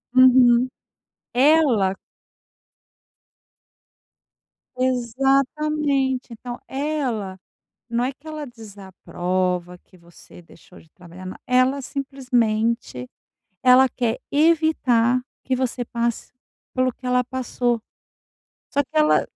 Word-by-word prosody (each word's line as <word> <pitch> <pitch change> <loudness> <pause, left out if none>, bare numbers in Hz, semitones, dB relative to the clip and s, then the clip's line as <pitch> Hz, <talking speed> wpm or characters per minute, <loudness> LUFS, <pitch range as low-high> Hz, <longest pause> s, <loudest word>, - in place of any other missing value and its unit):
Uhum. 255 -1 +6 0.7
Ela. 255 -8 +4 2.8
Exatamente, 270 +2 0
então 240 +2 -8
ela, 265 -10 -3 0.5
não 235 +1 0
é 260 - -1
que 280 +3 -24
ela 305 -1 -6
desaprova 185 -5 -4
que 185 - -23
você 170 0 -17
deixou 170 +2 -18
de 160 - -20
trabalhar 180 +1 -13
na 185 - -7
ela 255 +2 +2
simplesmente, 235 - -1 0.6
ela 255 +1 +7
quer 240 -3 -2
evitar 285 -6 +2 0.2
que 260 - 0
você 250 -1 -2
passe 235 0 -3 0.4
pelo 255 0 +2
que 255 - -16
ela 250 0 +2
passou. 245 -1 -2 0.9
Só 285 - +2
que 265 - -22
ela 305 0 +4
250 Hz, 95 wpm, -22 LUFS, 220-270 Hz, 2.8 s, ela